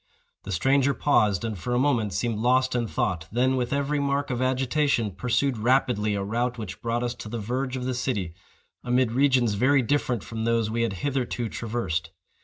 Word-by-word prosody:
The 100 - -5
stranger 135 +8 +2
paused, 105 -9 +2
and, 110 -2 -3
for 120 +8 -2
a - - +2
moment, 120 -6 +1
seemed 105 +4 -1
lost 130 +2 +2
in 120 -2 0
thought; 85 -5 -2
then, 130 +4 +2
with 125 -1 -1
every 140 +1 0
mark 140 0 0
of 125 0 -2
agitation, 130 -2 +1
pursued 125 +5 0
rapidly 115 -3 +2
a 100 - -2
route 120 +4 -1
which 100 -6 -7
brought 120 +1 -1
us 120 -1 -1
to 115 -3 -9
the 120 - -4
verge 130 +4 -2
of 125 - -4
the 130 - -1
city, 110 -9 -2 0.5
amid 125 -1 +2
regions 130 -3 +3
very 130 +6 +3
different 125 -4 0
from 110 -1 -5
those 115 -1 +1
we 115 +1 -1
had 115 -3 0
hitherto 125 -4 -1
traversed. 95 -9 -3
120 Hz, 195 wpm, -26 LUFS, 110-130 Hz, 0.5 s, regions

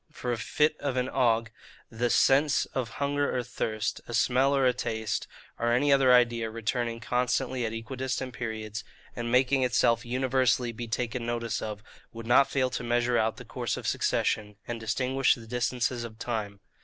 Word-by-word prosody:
For 125 -5 -4
a 120 - -1
fit 150 +6 +1
of 140 -3 -2
an 125 +1 0
ague; 115 -3 +1 0.4
the 120 +1 0
sense 140 +4 +4
of 120 -3 -4
hunger 145 -1 0
or 125 - -1
thirst; 110 -3 -3
a 120 - -3
smell 130 +4 +3
or 135 -1 +3
a 125 - +4
taste; 110 -3 -3 0.3
or 120 0 +1
any 140 +4 +4
other 135 -2 +5
idea 120 -2 +4
returning 115 +1 -2
constantly 125 +1 0
at - - -4
equidistant 130 +2 -4
periods, 110 -3 -5 0.3
and 120 0 -3
making 130 +2 +3
itself 120 -2 +2
universally 130 -1 +1
be 115 +1 -6
taken 120 +1 -2
notice 115 -1 -2
of, 105 -1 -5 0.3
would 115 0 -8
not 135 +4 +5
fail 130 -2 0
to - - -3
measure 120 0 +1
out 110 0 0
the - - -10
course - - -3
of - - -7
succession, 105 -1 0
and 120 -1 -4
distinguish 130 +4 +1
the 115 - -12
distances 125 +1 -1
of 110 -2 -8
time. 105 -4 -4
120 Hz, 180 wpm, -28 LUFS, 115-130 Hz, 0.4 s, other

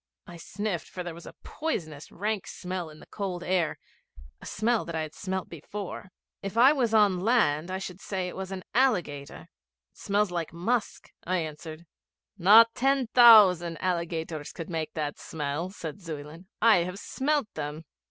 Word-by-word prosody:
I 175 - -11
sniffed, 195 +1 -4
for 180 - -6
there 175 -1 -6
was 170 +1 -12
a - - -11
poisonous 160 - -4
rank 205 +1 -3
smell 180 -2 -5
in 155 0 -14
the - - -14
cold 185 -4 -5
air 180 -4 0 0.6
a - - -9
smell 225 +2 0
that 170 - -5
I 160 - -1
had 155 -1 -6
smelt 190 -1 -4
before. 190 +4 -7 0.3
'If 195 +3 -5
I 260 +5 +7
was 250 -6 0
on 205 -4 +4
land 180 -7 +2
I 185 - -2
should 190 -1 -7
say 190 -2 -3
that 180 - -3
it - - -9
was 190 0 -6
an 190 -1 -5
alligator. 175 - 0 0.5
It - - -28
smells 205 -1 +1
like 170 -2 -3
musk,' 215 +7 -2
I 185 +1 0
answered. 155 0 -6 0.5
'Not 215 +5 +7
ten 270 -1 +1
thousand 195 -9 +7
alligators 165 -4 -3
could 165 0 -8
make 160 -2 -3
that 150 -2 -3
smell' 150 +3 -4
said 185 0 -8
Zuyland; 160 +1 -8 0.2
'I 230 -3 +7
have 180 +2 -2
smelt 280 +2 -1
them.' 150 +1 -5
180 Hz, 175 wpm, -27 LUFS, 165-210 Hz, 0.6 s, I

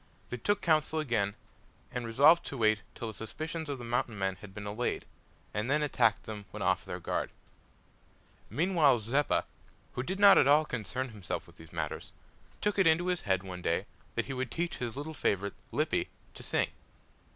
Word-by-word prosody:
They 125 - -2
took 205 - +1
counsel 155 -1 +3
again, 115 -9 0 0.6
and 125 -2 -3
resolved 145 +9 +6
to 140 - -5
wait 110 -2 +3 0.2
till 115 - -4
the - - -7
suspicions 155 +9 -5
of 140 - -2
the 120 - -8
Mountain 115 -2 -1
men 95 -1 -1
had 105 +1 -11
been 100 +2 -7
allayed, 105 +4 -2 0.5
and 105 +4 -1
then 150 +2 +3
attack 115 -6 +2
them 105 -2 -7
when - - -5
off - - +2
their - - -5
guard. - - -2 1.2
Meanwhile 160 -5 +4
Zeppa, 135 +7 +1 0.5
who 125 - -2
did 190 +9 -3
not 200 -1 +9
at - - +5
all 150 +2 +6
concern 125 +1 -3
himself 105 -5 -5
with - - -18
these 80 -1 -13
matters, 80 -3 -4 0.5
took 210 -1 +1
it 190 - +6
into 170 +3 +4
his 180 -1 0
head 95 0 +3
one 90 -2 -7
day 85 +3 0 0.3
that 115 - 0
he 135 - -4
would 130 0 -2
teach 170 +1 -2
his 120 -1 -4
little 150 +3 -4
favourite, 100 -8 0 0.2
Lippy, - - 0 0.2
to - - -10
sing. - - 0
125 Hz, 190 wpm, -31 LUFS, 105-155 Hz, 1.2 s, not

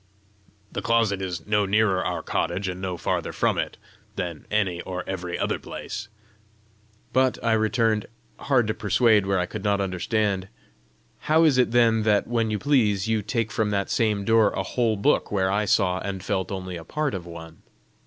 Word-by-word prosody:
"The - - -4
closet 115 -4 +1
is 90 -4 -4
no 105 -1 +1
nearer 100 -2 +2
our - - -3
cottage, 90 +4 -1
and 90 0 -4
no 90 -2 -3
farther - - -2
from - - 0
it, - - -3 0.4
than 85 -4 -5
any 95 -5 0
or 90 -1 -5
every 90 -2 -4
other - - -1
place." 105 +1 -7 1.1
"But," 130 0 +3
I 115 - +2
returned, 110 -1 +1 0.3
hard 130 -4 +2
to 110 - -1
persuade 105 0 +3
where 95 0 +2
I 90 - +1
could 90 - -7
not 100 -1 +1
understand, 95 +1 -1 0.7
"how 160 +2 +3
is 145 -5 +4
it 125 - +3
then 115 -2 +3
that, 105 -1 +2
when 115 -2 0
you 105 - -1
please, 110 -7 +2
you 110 -1 +1
take 110 +1 -2
from 110 0 0
that 100 -1 -1
same 105 -3 +1
door 115 -1 +4
a - - -2
whole 115 -4 0
book 140 +9 +1
where 95 -2 +1
I 105 +2 +1
saw 90 -2 +2
and 95 -2 -5
felt 95 -2 -2
only 95 -2 -5
a 85 - -9
part 150 - -2
of 90 -3 -5
one? 80 -1 -10
105 Hz, 185 wpm, -25 LUFS, 95-115 Hz, 1.1 s, is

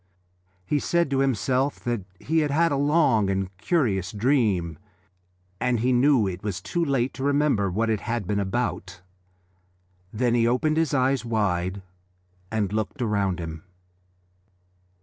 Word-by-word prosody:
He 145 +9 0
said 170 0 0
to 135 - +1
himself 135 +2 0
that 120 -3 -2 0.2
he 160 +2 0
had 150 -2 +1
had 165 +4 +2
a - - +1
long 140 -8 +3
and 95 0 -2
curious 100 - 0
dream, 105 - +1 0.8
and 125 -2 +1
he 125 +2 +2
knew 125 -2 +4
that 95 - -1
it 90 - -10
was 100 -4 -3
too 170 - -2
late 135 -4 0
to 130 +3 -6
remember 140 -8 +2
what 110 +6 0
it 110 -2 0
had 115 -1 -3
been 100 +3 -1
about. 95 -3 -3 1.1
Then 120 +2 0
he 115 -1 +3
opened 155 +6 +1
his 160 -3 +1
eyes 130 -2 +2
wide 100 -4 -1 0.7
and 105 -3 -1
looked 110 +6 -2
round 100 -6 0
him. 80 -1 -6
115 Hz, 150 wpm, -25 LUFS, 100-140 Hz, 1.1 s, knew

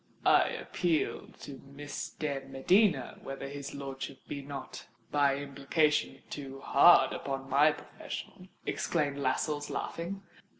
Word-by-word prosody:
"I - - +6
appeal 170 -4 -1
to 135 -2 -9
Miss 140 +1 -6
de 145 -3 -3
Medina 135 - +2
whether 135 0 -6
his 140 0 -6
lordship 135 -1 -6
be 140 - -4
not, 135 -1 -8 0.2
by 140 -2 +3
implication, 145 +2 0
too 135 -2 -6
hard 140 -1 +6
upon 135 -1 -4
my 140 +3 +5
profession," 185 +4 -8 0.2
exclaimed 145 -4 0
Lascelles, 145 +2 0
laughing. 190 +4 -4
140 Hz, 120 wpm, -31 LUFS, 135-150 Hz, 0.2 s, I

